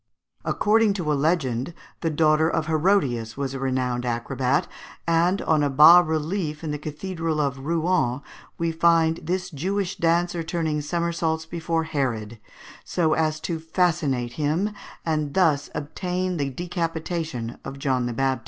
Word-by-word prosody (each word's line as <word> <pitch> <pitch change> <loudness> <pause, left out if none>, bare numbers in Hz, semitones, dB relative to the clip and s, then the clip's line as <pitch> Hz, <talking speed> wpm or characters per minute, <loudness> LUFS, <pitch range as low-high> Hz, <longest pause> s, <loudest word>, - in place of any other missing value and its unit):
According 215 0 +3
to 170 -6 -1
a - - +3
legend, 140 -2 0 0.2
the 165 - 0
daughter 155 0 +3
of 165 -2 0
Herodias 150 - +1
was 135 -1 -2
a 135 - -4
renowned 130 -2 -1
acrobat, 130 +6 0 0.4
and 170 +3 +2
on 155 -2 +2
a 145 - +2
bas 155 +6 +8
relief 155 0 -2
in 155 - -3
the 150 - -3
Cathedral 160 +1 -3
of 140 -2 0
Rouen 160 -6 +1 0.4
we 165 0 0
find 165 0 +3
this 180 +3 -2
Jewish 185 +5 -2
dancer 170 +1 +1
turning 160 -2 -1
somersaults 165 0 -1
before 165 0 -2
Herod, 120 -8 -2 0.4
so 160 -3 +1
as 155 -1 0
to 165 -2 -3
fascinate 160 -7 0
him, 165 +8 +1 0.3
and 155 -3 -1
thus 160 -7 +3
obtain 180 +4 -2
the 140 -2 -1
decapitation 165 - -3
of 135 - -7
John 130 -3 0
the 120 - -3
Baptist. 135 0 0
160 Hz, 145 wpm, -24 LUFS, 140-170 Hz, 0.4 s, bas